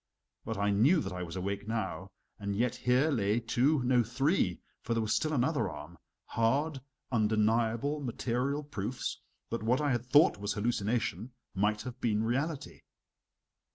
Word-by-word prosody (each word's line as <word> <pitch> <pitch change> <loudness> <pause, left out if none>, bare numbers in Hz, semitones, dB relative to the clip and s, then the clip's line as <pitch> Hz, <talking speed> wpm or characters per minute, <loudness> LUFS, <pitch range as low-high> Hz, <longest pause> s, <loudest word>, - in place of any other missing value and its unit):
But 110 - -3
I 100 +1 +1
knew 130 - +4
that 145 - -4
I 90 - -4
was 85 -1 -6
awake 100 +2 -3
now, 110 -4 -3 0.3
and 100 -1 -3
yet 120 +3 +1
here 130 +5 +2
lay 105 -3 +1
two 125 +5 +2
no, 125 0 +4
three 120 - +1 0.2
(for 115 - -2
there 115 - +1
was 110 - 0
still 155 - +1
another 140 - +1
arm) 80 +1 -9 0.3
hard, 135 +5 0 0.3
undeniable, 115 +5 +2
material 130 +2 -1
proofs 120 -3 -4 0.3
that 115 - -2
what 120 +4 +2
I 145 -2 +1
had 120 -1 -1
thought 145 -3 +5
was 105 0 -2
hallucination, 115 0 -1 0.2
might 105 +2 +1
have 125 0 -8
been 110 -2 +1
reality. 140 +6 -2
115 Hz, 155 wpm, -31 LUFS, 105-130 Hz, 0.3 s, thought